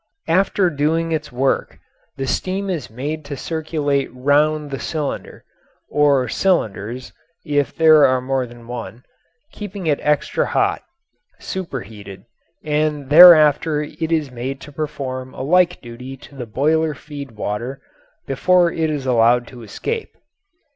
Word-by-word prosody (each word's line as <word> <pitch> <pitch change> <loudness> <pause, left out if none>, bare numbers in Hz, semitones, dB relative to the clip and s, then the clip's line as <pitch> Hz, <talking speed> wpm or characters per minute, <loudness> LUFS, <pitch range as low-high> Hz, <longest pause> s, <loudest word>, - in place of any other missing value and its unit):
After 185 +1 +2
doing 160 +3 0
its 155 -2 -3
work 130 +2 -1 0.4
the 135 - -2
steam 190 +7 -2
is 160 -8 -4
made 145 +7 -5
to 145 -1 -6
circulate 150 -3 -2
round 145 +3 +1
the 135 - -4
cylinder 155 -4 -5 0.5
(or 140 -3 +3
cylinders, 120 - -1 0.3
if 145 -3 0
there 155 -2 +6
are 130 0 +2
more 130 0 -1
than 120 0 -14
one), 120 0 -7 0.5
keeping 205 -3 -7
it 150 -3 +1
extra 150 0 0
hot - - 0 0.6
"superheated"; 110 - -7 0.4
and 150 -2 -1
thereafter 155 -2 +7
it 160 +2 -5
is 155 -5 0
made 130 +3 -5
to 150 - -11
perform 130 -3 -5
a - - -5
like 180 +4 +3
duty 125 +2 -9
to 135 - -16
the 125 -3 -6
boiler 155 +6 +1
feed 140 -3 -9
water, 110 +5 -4 0.5
before 180 -2 +3
it 160 -1 -1
is 145 -3 -3
allowed 120 -1 +3
to 125 -2 -12
escape. 445 - -5
145 Hz, 135 wpm, -20 LUFS, 130-160 Hz, 0.6 s, thereafter